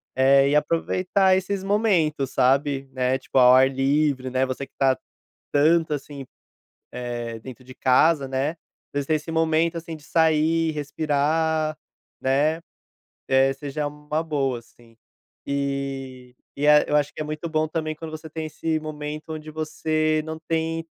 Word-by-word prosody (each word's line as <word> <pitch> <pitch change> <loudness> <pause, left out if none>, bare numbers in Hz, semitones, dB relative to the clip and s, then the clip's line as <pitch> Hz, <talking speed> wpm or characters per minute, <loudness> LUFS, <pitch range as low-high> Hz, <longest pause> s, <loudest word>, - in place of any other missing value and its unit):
Eh, 135 +1 +5
e - - +2
aproveitar 185 +5 +2
esses 190 +1 -2
momentos, 185 - +1
sabe, 135 +1 +1
né, 130 0 +1
tipo, 130 - -4
ao 125 0 +8
ar 130 +1 +6
livre, 135 0 +1
né, 130 +1 +1
você 130 +1 -4
que - - -30
está 135 -1 +2 0.6
tanto, 155 +2 +3
assim, 140 -1 -7 0.7
eh, 120 -2 -5
dentro 130 +2 -11
de 130 0 -12
casa, 135 +2 +3
né, 135 +2 0
às 165 - -10 0.4
vezes 140 -1 -1
ter 155 - +3
esse 155 +1 -3
momento, 160 +1 +1
assim, 165 0 -7
de 150 - -18
sair, 160 0 +2
respirar, 155 +1 0 0.4
né, 145 +5 +1 0.7
eh, 135 +1 +4
seja 145 +2 -4
uma 150 +1 -3
boa, 135 -6 -1
assim. 115 -1 -22 0.5
E 135 -2 -4 0.2
e 145 - +1
é 150 0 +6
eu - - +2
acho 145 -1 +1
que - - -6
é - - 0
muito 155 +2 -5
bom 155 -1 0
também 155 0 -3
quando 160 +1 -8
você 155 0 -8
tem 160 0 -5
esse 155 +1 -2
momento 150 0 -6
onde 155 0 -8
você 155 0 0
não 160 0 -6
tem 165 0 -1
150 Hz, 160 wpm, -24 LUFS, 135-160 Hz, 0.7 s, ao